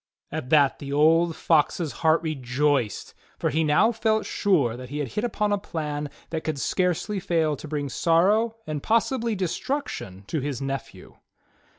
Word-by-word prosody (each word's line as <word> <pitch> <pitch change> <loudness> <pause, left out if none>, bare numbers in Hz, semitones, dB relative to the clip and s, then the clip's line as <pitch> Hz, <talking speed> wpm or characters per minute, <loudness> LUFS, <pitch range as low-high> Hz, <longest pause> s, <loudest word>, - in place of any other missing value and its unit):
At 125 - -4
that 145 -3 +4
the 140 -1 -6
old 160 +3 +4
Fox's 160 0 +1
heart 160 +1 +3
rejoiced, 135 - -1 0.2
for - - 0
he 160 +1 +1
now 155 +10 +4
felt 220 -1 0
sure 145 - +1
that 125 0 -9
he 145 - -5
had 145 -4 -2
hit 210 - -3
upon 210 -3 0
a 205 - +1
plan 150 -6 -4 0.2
that 160 -1 -3
could 155 -3 -2
scarcely 185 +6 0
fail 165 -5 +1
to 155 - -9
bring 145 -1 -2
sorrow, 195 - +2
and 150 -4 -4
possibly 230 - +1
destruction, 180 - -3
to 155 - -2
his 140 -2 -3
nephew. 135 0 -6
160 Hz, 165 wpm, -25 LUFS, 145-195 Hz, 0.2 s, that